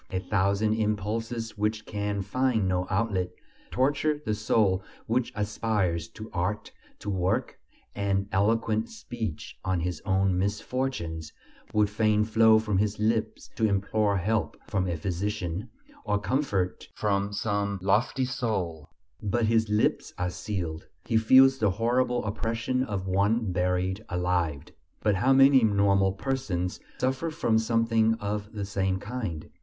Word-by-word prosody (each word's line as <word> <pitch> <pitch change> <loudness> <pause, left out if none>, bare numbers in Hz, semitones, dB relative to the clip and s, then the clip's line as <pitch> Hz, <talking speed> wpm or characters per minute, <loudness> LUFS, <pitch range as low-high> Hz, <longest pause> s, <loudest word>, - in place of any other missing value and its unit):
A 95 - -2
thousand 100 +2 +1
impulses 110 +1 -2
which 110 +1 -1
can 100 -1 -2
find 115 0 +1
no 90 0 0
outlet 95 -3 0 0.4
torture 145 +3 +1
the 110 - 0
soul 105 -3 +2 0.2
which 120 +2 0
aspires 105 -5 -1
to 110 0 -7
art, 100 +4 -2 0.3
to - - -12
work; 95 +6 -1 0.3
and 100 -1 0
eloquent 110 +2 +1
speech 120 - -6
on 95 -2 0
his 90 -1 -3
own 95 -1 +2
misfortunes 100 - -2 0.4
would 105 -1 +3
fain 105 0 +2
flow 110 0 +5
from 105 -3 0
his 105 0 0
lips 110 +1 -1
to 110 - +3
implore 100 0 +1
help 105 +4 -1
from 95 -2 0
a 85 -2 -1
physician, 95 +1 -3 0.3
or 105 -1 +1
comfort 100 -5 -1
from 100 -1 0
some 100 -1 -1
lofty 115 +6 +2
soul; 95 - -3 0.3
but 110 +3 0
his 110 0 +2
lips 105 +1 +1
are 90 0 -1
sealed. 85 -6 -4 0.2
He 115 - -1
feels 130 +4 +6
the 105 - +3
horrible 120 +4 +1
oppression 115 +4 -1
of 100 -6 -3
one 100 +3 +1
buried 90 +2 0
alive. 90 -5 0 0.4
But 105 - +3
how 130 +7 +3
many 135 -1 +7
normal 100 -2 +3
persons 100 -7 -2 0.2
suffer 130 +6 0
from 115 -7 +1
something 115 0 +2
of 105 -1 -4
the 100 -2 -3
same 95 -1 0
kind! 100 -7 -5
105 Hz, 140 wpm, -27 LUFS, 95-115 Hz, 0.4 s, many